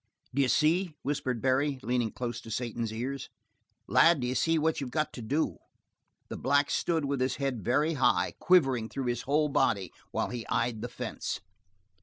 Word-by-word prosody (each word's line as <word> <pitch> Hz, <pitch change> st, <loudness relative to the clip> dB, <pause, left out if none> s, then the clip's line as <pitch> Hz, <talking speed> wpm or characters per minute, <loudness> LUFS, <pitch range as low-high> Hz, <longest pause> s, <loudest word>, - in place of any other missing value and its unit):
"D'ye 135 Hz, 0 st, +3 dB
see?" 160 Hz, +5 st, +2 dB
whispered 130 Hz, -4 st, -2 dB
Barry, 135 Hz, +1 st, +2 dB
leaning 120 Hz, -3 st, 0 dB
close 120 Hz, -1 st, -4 dB
to -, -, -11 dB
Satan's 115 Hz, -1 st, -3 dB
ears. 130 Hz, +5 st, -4 dB, 0.6 s
"Lad, 170 Hz, -2 st, +5 dB
d'ye 125 Hz, 0 st, -1 dB
see 165 Hz, +6 st, +2 dB
what 160 Hz, -1 st, +1 dB
you've 135 Hz, -, -3 dB
got 155 Hz, +3 st, -1 dB
to 125 Hz, -, -7 dB
do?" 125 Hz, -, -1 dB, 0.7 s
The -, -, -6 dB
black 145 Hz, 0 st, +2 dB
stood 165 Hz, -4 st, +1 dB
with 140 Hz, -2 st, -1 dB
his 130 Hz, -, +1 dB
head 135 Hz, -6 st, -2 dB
very 150 Hz, -, +2 dB
high, 135 Hz, -4 st, +2 dB
quivering 135 Hz, -11 st, +3 dB
through 135 Hz, -, -4 dB
his 120 Hz, -1 st, -1 dB
whole 150 Hz, +1 st, +3 dB
body 105 Hz, -, +1 dB, 0.2 s
while -, -, -1 dB
he 120 Hz, -2 st, -4 dB
eyed 115 Hz, -2 st, 0 dB
the -, -, -4 dB
fence. -, -, -4 dB
135 Hz, 175 wpm, -29 LUFS, 120-150 Hz, 0.7 s, Lad